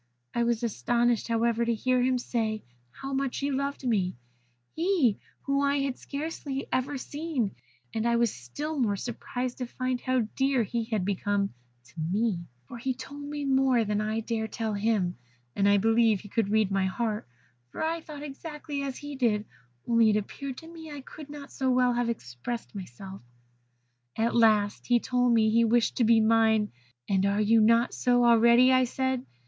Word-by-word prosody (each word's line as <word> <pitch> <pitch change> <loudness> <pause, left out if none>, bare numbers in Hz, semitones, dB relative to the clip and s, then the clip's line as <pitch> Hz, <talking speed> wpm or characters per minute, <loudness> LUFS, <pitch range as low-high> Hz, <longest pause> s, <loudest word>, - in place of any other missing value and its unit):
I 235 - +1
was 235 0 0
astonished, 235 +1 +1
however, 230 0 +1
to 235 0 +1
hear 255 +3 +1
him 255 0 +2
say 220 -3 -2 0.3
how 270 - -7
much 270 -1 -1
he 280 +1 -1
loved 275 0 -2
me 195 -6 +1 0.6
he, 325 - +2 0.2
whom 275 0 +1
I 280 0 +2
had 275 -2 -1
scarcely 280 -2 -4
ever 270 +2 -1
seen; 285 - -3 0.4
and 225 +1 0
I 235 - +3
was 235 -2 +2
still 290 - -5
more 215 -5 +2
surprised 245 +3 -4
to 250 - -3
find 255 0 -2
how 255 -1 +1
dear 270 -2 +2
he 230 +2 -2
had 215 -5 -1
become 200 0 0 0.3
to 120 0 -21
me, 180 +2 -1 0.2
for 240 - -8
he 260 +2 -2
told 280 +3 -9
me 290 0 -4
more 265 -3 +3
than 210 0 0
I 215 +1 -1
could - - -15
dare 225 -2 -1
tell 220 -1 -3
him; 205 -4 0 0.4
and 200 0 +3
I 205 - +5
believe 225 0 +3
he 205 - -12
could 220 -1 0
read 215 -2 +2
my 195 -1 +1
heart, 215 - -2 0.4
for - - -5
I 325 +1 -1
thought 295 -2 -9
exactly 295 0 -6
as 275 -2 -4
he 290 0 -7
did, 220 -5 +1 0.4
only 230 -2 +5
it 210 - +3
appeared 260 +5 -5
to 325 - -10
me 325 -1 -10
I 290 -2 -7
could 295 +2 -11
not 290 -1 -9
so 265 -1 -1
well 250 -1 +3
have 240 0 0
expressed 210 - -5
myself. 190 - -9 0.9
"At 225 +1 +1
last 215 -3 +3
he 245 -1 +4
told 250 0 +1
me 225 -2 +4
that - - 0
he 230 +1 +5
wished 230 +1 +2
to 245 - +3
be 225 0 +5
mine. 220 -1 +3 0.4
'And 195 -1 +2
are 200 +1 +1
you 220 +2 +4
not 230 +2 +4
so 245 -1 +3
already?' 235 +2 +6
said 260 +1 -1
I. - - -21
235 Hz, 190 wpm, -28 LUFS, 215-265 Hz, 0.9 s, already